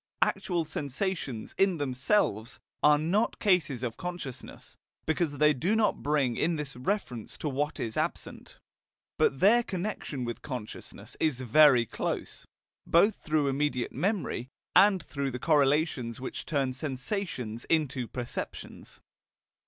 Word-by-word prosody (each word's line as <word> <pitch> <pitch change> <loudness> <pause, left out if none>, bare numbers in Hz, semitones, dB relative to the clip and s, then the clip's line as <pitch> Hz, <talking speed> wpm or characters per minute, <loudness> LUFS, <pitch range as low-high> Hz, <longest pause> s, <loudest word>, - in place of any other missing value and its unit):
Actual 175 -3 -1
sensations, 145 - -3
in 195 -3 +3
themselves, 130 - 0 0.2
are 150 0 +6
not 180 +9 +1
cases 160 - +2
of 120 -3 -3
consciousness, 175 -8 -7 0.3
because 160 -2 0
they 150 +1 +5
do 170 - 0
not 220 -2 +2
bring 140 -5 +1
in 165 +2 +1
this 150 -3 -5
reference 125 - -3
to - - -4
what 145 +2 -2
is 110 -1 -3
absent. - - -4 0.6
But 135 - +2
their 225 +5 +6
connection 180 - -4
with 120 -1 -5
consciousness 125 -6 -8
is 145 -5 +1
very 130 0 +6
close, - - -4 0.4
both 200 +6 +4
through 150 -2 0
immediate 135 -2 0
memory, 170 - -2 0.3
and 190 -2 +6
through 140 -2 -3
the 125 - -4
correlations 145 -4 +2
which 130 - -6
turn 135 -4 0
sensations 130 - -4
into 140 -6 0
perceptions. 120 0 -7
145 Hz, 130 wpm, -29 LUFS, 125-175 Hz, 0.6 s, are